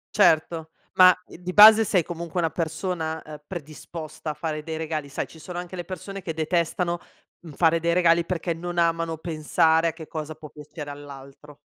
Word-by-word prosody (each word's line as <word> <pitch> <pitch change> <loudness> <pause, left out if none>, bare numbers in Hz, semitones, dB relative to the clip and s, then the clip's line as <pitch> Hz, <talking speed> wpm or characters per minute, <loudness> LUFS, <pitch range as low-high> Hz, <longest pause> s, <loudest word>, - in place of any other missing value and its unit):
Certo, 160 -4 +3 0.2
ma, 185 0 +8
ehm, - - -12
di 180 +1 -4
base 215 +1 +10
sei 185 - +2
comunque 170 +1 -5
una 165 - +1
persona, 160 -1 -3
ehm, 150 -1 -11
predisposta 155 -1 -7
a - - -6
fare 155 -1 -4
dei 160 +1 -5
regali 155 -2 -3
sai, 140 - -4
ci - - -15
sono 175 +3 -7
anche 180 +1 -7
le 175 -2 -5
persone 195 +1 -7
che 165 - -4
detestano, 170 +2 0 0.4
uhm, 165 -4 -11
fare 165 +1 +3
dei 170 +1 +1
regali 170 -1 +4
perché 170 -1 -2
non 175 +1 -4
amano 165 -1 +1
pensare 160 +1 +2
a - - -6
che 160 -2 -10
cosa 155 -1 -5
può 155 0 -12
piacere 150 0 -9
all'altro. 145 0 -11
165 Hz, 190 wpm, -25 LUFS, 155-175 Hz, 0.4 s, base